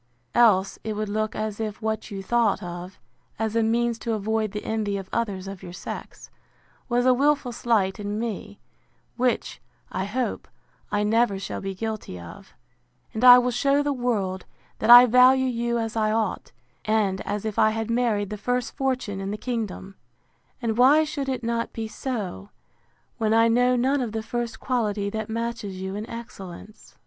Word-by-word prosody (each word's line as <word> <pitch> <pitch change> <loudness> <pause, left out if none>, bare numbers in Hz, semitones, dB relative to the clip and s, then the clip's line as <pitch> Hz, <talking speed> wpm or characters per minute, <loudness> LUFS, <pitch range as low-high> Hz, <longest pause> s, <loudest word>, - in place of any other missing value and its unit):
Else 200 -5 +4
it 220 - -3
would 210 0 -3
look 215 +1 -1
as 215 -1 -3
if 215 -2 -4
what 220 -1 -3
you 195 -2 -6
thought 230 -1 +1
of, 175 +1 -7 0.4
as 220 0 -2
a 230 - +3
means 230 +1 +1
to 230 0 -2
avoid 220 0 -1
the 210 0 -6
envy 215 -2 -1
of 195 -1 -7
others 200 -5 -2
of 195 -1 -7
your 175 - -9
sex, - - -8 0.6
was 245 0 +2
a 255 - +6
wilful 280 -1 +2
slight 220 -5 0
in 205 0 -3
me, 210 -2 -5 0.6
which, 250 0 -1 0.3
I 190 - -2
hope, 245 +5 -3 0.4
I 205 0 +1
never 220 -1 +2
shall 195 - -5
be 195 0 -4
guilty 215 - -5
of; 85 - -12 0.6
and 220 - -3
I 250 -1 +11
will 250 0 +2
shew 275 +4 +2
the 290 0 0
world, 205 -8 -2 0.3
that 215 - -1
I 245 +1 +12
value 255 +2 +5
you 235 -1 -1
as 225 -1 -3
I 215 -1 +1
ought, 220 0 -1 0.3
and 210 -3 +1
as 205 +1 -4
if 215 -2 -2
I 215 - +5
had 225 +1 -3
married 225 -4 0
the 210 - -4
first 245 +4 -2
fortune 255 -8 -2
in 195 - -4
the 210 - -3
kingdom: 210 -5 -4 0.7
And 225 0 -1
why 285 +5 +6
should 295 -3 -3
it 255 -2 -3
not 230 0 -2
be 225 -1 -4
so, 210 - -5 0.7
when 220 0 +2
I 225 0 +5
know 245 +2 +3
none 265 +3 +1
of 230 -4 -3
the 220 -1 -3
first 235 -1 -4
quality 210 -5 -1
that 220 0 -4
matches 225 -4 -4
you 190 0 -4
in 210 +2 -6
excellence? 215 -3 -10
220 Hz, 180 wpm, -25 LUFS, 205-240 Hz, 0.7 s, I